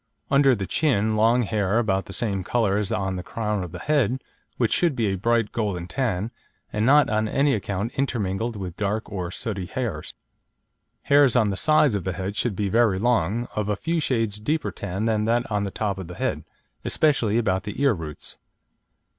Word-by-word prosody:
Under 140 -2 +5
the 100 -3 -3
chin, 110 - +1
long 115 +3 +4
hair, 105 -1 0
about 100 -5 +1
the - - -9
same 100 -2 -2
colour 105 -1 +1
as 105 -2 -2
on 95 -1 -1
the - - -3
crown 105 +1 -2
of 90 - -7
the 90 - -7
head, 130 +1 +1 0.4
which 115 -3 +1
should 170 -5 +2
be 115 - 0
a 95 - 0
bright, 115 +2 +1
golden 100 -6 -2
tan, 110 -1 -2 0.4
and 105 +2 +1
not 145 0 +6
on 110 0 0
any 140 +5 +2
account 100 +1 -2
intermingled 115 -4 -1
with 95 -4 -6
dark 105 +1 -2
or 90 -3 -3
sooty 95 -1 -4
hairs. 110 - -4 0.9
Hairs 140 -4 +5
on 110 -4 +3
the - - -2
sides 155 +2 +3
of 100 -3 -1
the 95 - -2
head 95 +3 -4
should 110 -2 -1
be 100 +1 -1
very 110 -1 +3
long, 115 0 +1
of 105 -1 -1
a 105 - +1
few 165 - -1
shades 115 -8 -1
deeper 150 +9 -1
tan 100 +2 -4
than 110 -2 +1
that 120 +2 +1
on 105 -1 0
the - - -2
top 100 -1 -2
of 95 - -6
the 90 - -8
head, - - -2 0.4
especially 120 -8 +2
about 95 -5 +1
the 105 +3 -7
ear 140 -2 +4
roots. 80 -5 -8
105 Hz, 200 wpm, -24 LUFS, 95-120 Hz, 0.9 s, not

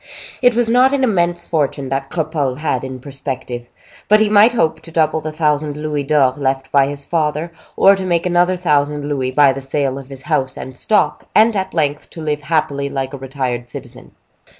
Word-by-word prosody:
It 245 -2 +4
was 240 -1 +2
not 250 +4 +4
an 275 -1 +1
immense 175 -7 +1
fortune 140 -4 -1
that 135 0 -2
Cropole 155 -6 -2
had 145 -5 -1
in 130 -1 -6
perspective; 130 -3 -6 0.4
but 215 +1 +5
he 215 -1 +3
might 215 +3 +6
hope 165 -9 +1
to - - -12
double 160 -1 +1
the 155 - -4
thousand 150 -1 0
louis 150 -1 -2
d'or 140 -3 +3
left 135 -1 -2
by 140 -1 +4
his 140 0 -6
father, 155 0 -1 0.3
to 195 -1 +5
make 175 -2 0
another 180 +1 +2
thousand 150 -3 0
louis 135 -3 -1
by 140 +1 +4
the 135 - -6
sale 135 0 -2
of 135 -1 -12
his 135 -1 -8
house 130 -2 -1
and 130 0 -8
stock, 210 - +1
and 220 +1 +5
at 190 -3 -3
length 150 -3 -1
to - - -11
live 150 -1 -2
happily 145 -3 -1
like 135 0 -3
a - - -5
retired 130 -3 -4
citizen. 125 -2 -10
150 Hz, 195 wpm, -18 LUFS, 135-170 Hz, 0.4 s, might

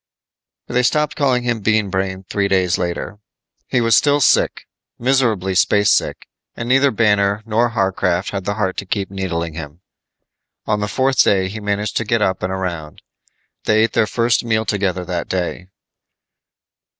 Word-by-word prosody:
They 125 +1 0
stopped 150 +4 +1
calling 130 -4 +1
him 120 -2 -1
Bean 110 -1 +1
Brain 95 0 -3
three 100 -1 0
days 95 -2 +1
later. 90 +3 -4 0.5
He 125 - +1
was 115 -2 +4
still 145 +3 +3
sick, 140 - +2 0.3
miserably 120 -7 +1
spacesick, 100 +2 +2 0.3
and 115 - -5
neither 135 +3 +4
Banner 105 -2 +1
nor 115 +2 +1
Warcraft 95 -2 0
had 100 -1 -4
the 100 0 -1
heart 95 -3 -2
to 100 - -5
keep 100 0 -2
needling 85 -4 -3
him. 80 +1 -9 0.8
On 105 -1 0
the 105 - -2
fourth 130 +5 +2
day 95 -2 +2
he 110 +3 -6
managed 105 0 -2
to - - 0
get 110 0 +1
up 95 -2 -1
and 90 - -2
around. 85 -5 -5 0.6
They 110 0 +3
ate 115 - 0
their 115 -2 +2
first 115 0 +1
meal 110 -1 0
together 95 -4 -1
that 85 -1 -4
day. 90 0 -3
105 Hz, 160 wpm, -19 LUFS, 95-115 Hz, 0.8 s, was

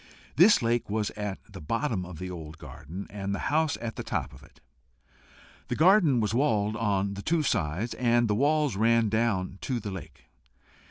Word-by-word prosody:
This 180 - +6
lake 115 0 0
was 105 -1 -1
at 105 -2 -4
the - - -11
bottom 110 - -2
of 90 -3 -9
the 90 +2 -6
old 80 -2 -8
garden, 80 +7 -9
and 100 -1 -3
the - - -3
house 155 -1 +2
at 115 -1 -5
the - - -4
top - - -3
of - - -14
it. - - -20 1.1
The - - -2
garden 170 - +5
was 110 -1 0
walled 110 -6 +1
on 100 -3 0
the 100 - -6
two 160 +6 +1
sides, 100 - -1
and 120 -1 +2
the 105 - +1
walls 145 +2 +2
ran 115 +3 +3
right 110 - 0
down 100 -4 0
to 125 -3 -2
the 105 -2 -6
lake. 95 -2 -9
110 Hz, 195 wpm, -28 LUFS, 95-125 Hz, 1.1 s, This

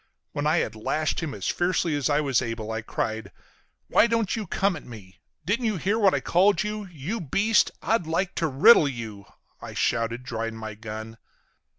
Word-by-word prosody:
When 145 +1 -2
I 155 +3 +3
had 110 - 0
lashed 150 +8 -1
him 160 -7 -4
as 100 - -4
fiercely 175 -2 +1
as 145 -1 0
I 145 +1 +3
was 135 -4 +1
able 115 -3 -4
I 110 0 -2
cried: 110 0 -3 0.6
"Why 235 - +5
don't 230 -3 0
you 215 -4 -4
come 195 +2 +1
at 150 - -8
me? 100 -6 -12 0.3
Didn't 230 +6 0
you 215 -3 0
hear 200 +7 0
what 195 -3 +4
I - - +1
called 190 +1 +3
you? 210 -1 -4
You 175 +9 -4
beast! 200 - +2
I'd 220 -7 +1
like 175 +3 -1
to 165 - +1
riddle 155 - +6
you!" 110 -6 -6 0.4
I - - -8
shouted, 115 +1 0
drawing 115 -2 -4
my 110 -1 -6
gun. 110 +1 -8
150 Hz, 195 wpm, -25 LUFS, -, 0.6 s, riddle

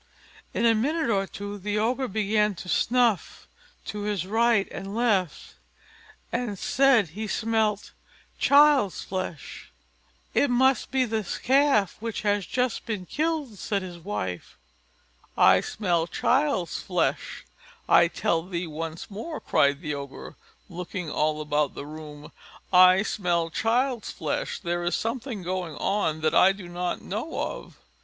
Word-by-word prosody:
In 235 - 0
a 230 - +6
minute 275 +4 0
or 195 -2 +1
two 205 +1 -7
the 205 +2 -2
Ogre 250 +5 0
began 210 0 +1
to 180 - -9
snuff 235 +3 +1 0.4
to 210 - -5
his 205 -3 -2
right 225 0 +2
and 195 +2 -6
left, 205 - 0 0.8
and 235 -4 -2
said 250 - +3
he 215 +7 -5
smelt 220 -2 0 0.5
child's 280 -8 +4
flesh. 185 -4 -6 0.6
"It 285 - +3
must 260 +2 +2
be 260 0 +1
this 220 -4 -3
calf 265 -7 +2
which 225 -1 -4
has 205 -3 0
just 250 -1 -1
been 210 -5 -3
killed," 300 - -2
said 200 +1 -2
his 175 -2 -8
wife. 100 - -5 0.8
"I - - +6
smell 175 -5 -1
child's 255 - 0
flesh, - - -2 0.4
I 170 - +6
tell 170 -1 0
thee 175 0 -4
once 165 +3 -6
more," 265 +11 -6
cried 140 0 +2
the 150 -1 -2
Ogre, 140 - -8 0.3
looking 180 -1 -6
all 155 0 0
about 150 -1 0
the - - -6
room; 150 -1 -10 0.4
"I 185 +2 +7
smell 175 -6 -1
child's 240 - 0
flesh; - - -3
there 175 -2 -3
is 175 - 0
something 230 -3 -3
going 180 -3 -3
on 160 -4 -1
that 155 0 +1
I 190 +1 +6
do 195 -2 -10
not 175 0 -3
know 220 - -4
of." - - -5
200 Hz, 140 wpm, -26 LUFS, 170-230 Hz, 0.8 s, I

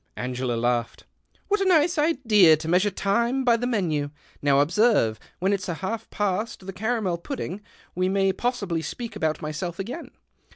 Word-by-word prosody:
Angela 125 0 -2
laughed. 120 0 -1 0.2
" - - -38
What 415 0 +1
a - - +2
nice 345 -2 +3
idea 225 - +5
to 160 +1 -7
measure 180 +5 +3
time 235 +7 0
by 240 -2 +4
the 240 +2 -2
menu. 165 -11 0 0.3
Now 140 -1 +4
observe, 160 - +3 0.2
when 190 +3 +1
it's 195 -1 -2
half 195 +6 -4
past 205 0 -2
the 195 - -6
caramel 210 -4 -1
pudding, 205 - -5 0.3
we 185 +1 0
may 195 0 +2
possibly 200 -10 -2
speak 225 +7 -6
about 160 -6 -1
myself 165 +3 -4
again. 240 - -6
195 Hz, 165 wpm, -25 LUFS, 160-235 Hz, 0.3 s, idea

